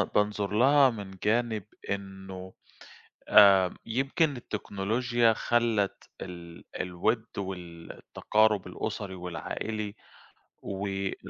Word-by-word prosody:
بانظر 105 -1 +1
لها 135 +4 +6
من 100 -4 -7
جانب 110 -1 +1 0.3
إنّه 95 -1 -6 0.8
آآ 95 -3 +7
يمكن 135 +4 0
التكنولوجيا 115 +2 0
خلّت 115 -3 0
ال 85 -1 -9 0.2
الود 110 +6 0
والتقارب 95 +3 -1
الأُسري 95 -2 -4
والعائلي، 100 +4 -4 0.7
وال 95 0 -3
100 Hz, 80 wpm, -28 LUFS, 95-115 Hz, 0.8 s, آآ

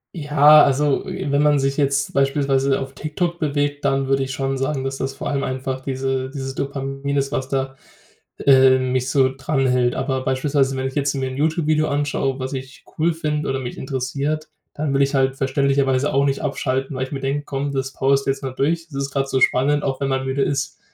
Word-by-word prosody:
Ja, 150 -1 +6
also, 140 +1 +1
äh, 185 -5 -4
wenn 140 0 +3
man 150 -1 +4
sich 135 0 0
jetzt 140 0 +1
beispielsweise 135 -1 +2
auf 135 0 -6
TikTok 170 +4 -3
bewegt, 145 -1 -1
dann 135 -1 +1
würde 135 0 +2
ich 135 0 -4
schon 135 0 -2
sagen, 135 0 -2
dass 135 0 -3
das 135 0 -3
vor - - -5
allem 140 -1 -1
einfach 130 0 -3
diese 130 0 -2
dieses 135 -1 -5
Dopamin 135 0 -3
ist, 140 0 0
was 130 -2 -2
da 135 0 -2 0.7
äh, 130 -1 +6
mich 130 0 -1
so 130 -1 +3
dran 135 0 -1
hält. 125 -1 +2
Aber 130 0 -2
beispielsweise, 135 0 +1
wenn 130 0 -1
ich 130 - -7
jetzt 140 -1 +1
mir 135 -1 -2
'n 130 - -7
YouTube-Video 155 0 +1
anschaue, 140 -2 -1
was 130 0 -4
ich 130 0 -7 0.2
cool 165 +2 +3
finde 150 -2 -2
oder 135 0 -1
mich 125 -2 -6
interessiert, 140 +4 -3 0.2
dann 145 -2 -2
will 135 - +2
ich 140 +1 0
halt 135 0 +1
verständlicherweise 135 0 +1
auch 140 +1 +3
nicht 140 -1 0
abschalten, 135 +1 -2
weil 130 0 -1
ich - - -13
mir 135 - -3
denke: 140 +2 -2
„Komm, 140 0 -3
das 135 0 -2
powerst 140 +1 +1
du - - +4
jetzt 135 - -6
mal 135 - -3
durch. 165 +5 -1
Das 150 - -12
ist 140 - -5
gerade 135 -1 -1
so 130 - 0
spannend.“ 145 +4 +3
Auch 135 0 -2
wenn 140 - 0
man 135 0 -1
müde 135 +1 -1
ist. 140 -1 -2
135 Hz, 220 wpm, -21 LUFS, 135-145 Hz, 0.7 s, Ja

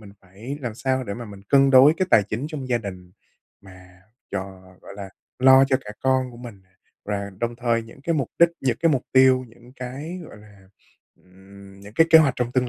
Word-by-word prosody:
mình 100 -2 -14
phải 105 +10 -9
làm 120 -4 -5
sao 130 +1 -2
để 100 -2 -5
mà 120 - -8
mình 100 -2 -12
cân 135 -1 +4
đối 135 +4 +7
cái 185 - 0
tài 105 - +6
chính 110 +8 -5
trong 140 -5 -7
gia 120 -1 +1
đình 90 -4 -9 0.5
mà 95 -1 -17 0.3
cho, - - -2 0.4
gọi - - -12
là, 100 -1 -8 0.3
lo 130 +1 +6
cho 130 -1 +1
cả 105 - -8
con 130 -1 0
của 120 - -14
mình. 115 -5 -11 0.4
Và 100 -1 -4
đồng 120 0 -3
thời 115 -1 0
những 115 +4 -15
cái 165 +2 -1
mục 140 -6 -1
đích, 170 0 +6
những 125 -3 0
cái 165 -1 +3
mục 130 - 0
tiêu, 130 -1 +4
những 120 +2 -19
cái, 140 +8 -7
gọi - - -13
là, 105 -2 -18 0.6
ừm, 95 +1 -17
những 100 +1 -13
cái 165 +5 +4
kế 160 - +9
hoạch 140 -5 +3
trong 125 0 -2
tương 125 -1 0
120 Hz, 220 wpm, -23 LUFS, 100-130 Hz, 0.6 s, kế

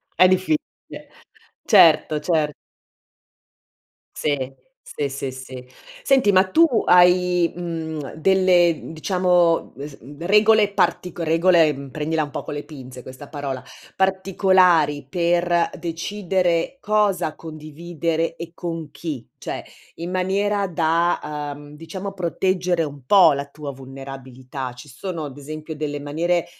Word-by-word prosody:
È 185 - +6
difficile. 185 +12 -2 0.6
Certo, 155 - +5
cer 150 -2 0 1.6
Sì, 135 -3 -2 0.3
sì, 145 -2 -4
sì, 135 -1 -4
sì. 130 -1 -10 0.3
Senti, 265 -7 +3
ma 190 0 +5
tu 330 - +6 0.2
hai, 180 -1 +4
mhmm, 160 -4 -5
delle, 180 0 +4
mhmm, 160 - -10
diciamo, 180 0 +1
mhmm, 140 - -7
se 145 -2 -11
mhmm, 145 +6 -10
regole 210 +1 +4
partico 175 -2 0
regole, 165 0 +4
mhmm, 140 0 -9
prendila 155 +2 -1
un 145 - -7
po' - - -5
con - - -6
le 145 - -5
pinze 130 -4 -11
questa 130 +2 -11
parola, 140 -3 -5 0.3
particolari 185 -6 +3
per 175 +1 +1
decidere 175 +3 -1
cosa 205 - +1
condividere 165 +1 -4
e 170 0 -7
con 165 -3 -5
chi, 150 -8 -6
cioè - - -6 0.3
in 170 +2 -6
maniera 195 +2 0
da, 160 -3 0
uhm, 145 +1 -13
diciamo 190 +5 -7
proteggere 180 -1 0
un 145 -3 -7
po' 175 0 +6
la 140 0 -3
tua 145 0 -8
vulnerabilità? 130 -1 -8
Ci 145 +4 -13
sono 165 +4 -5
ad 145 -1 -9
esempio 155 +2 -7
delle 145 -1 -4
maniere 165 +4 -1
165 Hz, 130 wpm, -22 LUFS, 145-180 Hz, 1.6 s, È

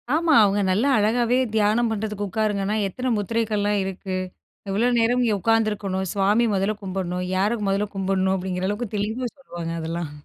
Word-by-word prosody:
ஆமா. 325 -1 +2
அவங்க 200 0 +2
நல்லா 220 +9 +2
அழகாவே 235 +3 +2 0.2
தியானம் 220 +2 +2
பண்ணுறதுக்கு 210 -1 -3
உட்காருங்கன்னா, 210 0 0
எத்தனை 250 +7 -3
முத்திரைகள்லாம் 210 -1 0
இருக்கு, 190 0 -5 0.5
எவ்வளோ 220 +6 +2
நேரம் 245 +2 +2
இங்க 225 -3 +2
உட்காந்துருக்கணும், 210 -3 0
சுவாமி 205 +4 +3
மொதல்ல 195 +2 0
கும்பிடணும், 180 -1 -3
யார 210 +5 +1
மொதல்ல 200 +2 0
கும்பிடணும் 190 0 +1
அப்படிங்கிற 185 0 -2
அளவுக்கு 210 +1 -4
தெளிவா 220 +5 -2
சொல்லுவாங்க 170 -10 -6
அதெல்லாம். 165 -1 -4
205 Hz, 145 wpm, -23 LUFS, 190-225 Hz, 0.5 s, சுவாமி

